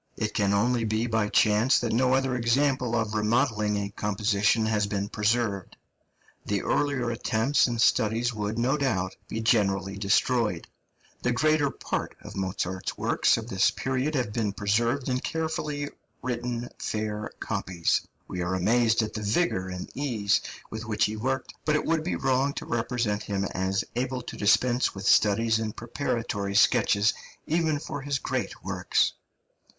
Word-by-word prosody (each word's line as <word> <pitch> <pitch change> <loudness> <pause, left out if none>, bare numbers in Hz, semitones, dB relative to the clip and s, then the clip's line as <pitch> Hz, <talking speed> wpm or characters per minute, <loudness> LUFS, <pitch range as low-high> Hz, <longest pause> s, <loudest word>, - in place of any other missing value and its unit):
It - - -2
can 100 -1 +1
only 115 +4 +2
be 110 +1 0
by 110 -3 0
chance 110 +6 +4
that 120 -2 -1
no 130 +2 +3
other 135 -1 +1
example 125 0 +1
of 110 -2 -1
remodelling 105 -1 +1
a 100 0 -3
composition 105 +2 +1
has 105 -2 +1
been 100 0 -2
preserved; 105 -3 -1 0.7
the 100 -1 -1
earlier 135 -5 0
attempts 115 +5 +2
and 120 -1 -3
studies 115 +1 +2
would, 105 +1 -3
no 125 +5 +2
doubt, 95 -10 -1
be 110 - -4
generally 100 -4 +1
destroyed. 105 -1 +1 0.5
The 125 - +1
greater 150 +3 +2
part - - -4
of - - -10
Mozart's 95 -1 -3
works - - +2
of 115 -1 -5
this 95 -5 +3
period 130 +3 -2
have 120 -6 -1
been 105 -4 -1
preserved 115 +6 0
in 125 -1 0
carefully 155 -2 -3 0.3
written 120 -1 -3
fair 105 0 -3
copies. 85 -2 0 0.3
We 90 - -4
are 90 +2 -1
amazed 115 +4 +3
at 110 - -5
the 110 - -4
vigour 105 - 0
and 90 0 -5
ease 115 -8 +1 0.3
with 110 +1 -5
which 110 -2 +1
he 105 - -2
worked, 130 +4 -2
but 150 - +2
it 150 - 0
would 165 -1 +1
be 175 - -1
wrong 135 +2 +1
to - - -6
represent 115 -3 -1
him 100 -2 -2
as 95 +1 0
able 125 0 -2
to - - -7
dispense 120 +5 +2
with 95 - -6
studies 110 +2 +4
and 110 -1 -3
preparatory 115 -5 -3
sketches, 105 -2 +4 0.3
even 160 -1 +1
for 145 0 -6
his 140 0 -1
great - - -4
works. - - +1
115 Hz, 160 wpm, -27 LUFS, 105-125 Hz, 0.7 s, chance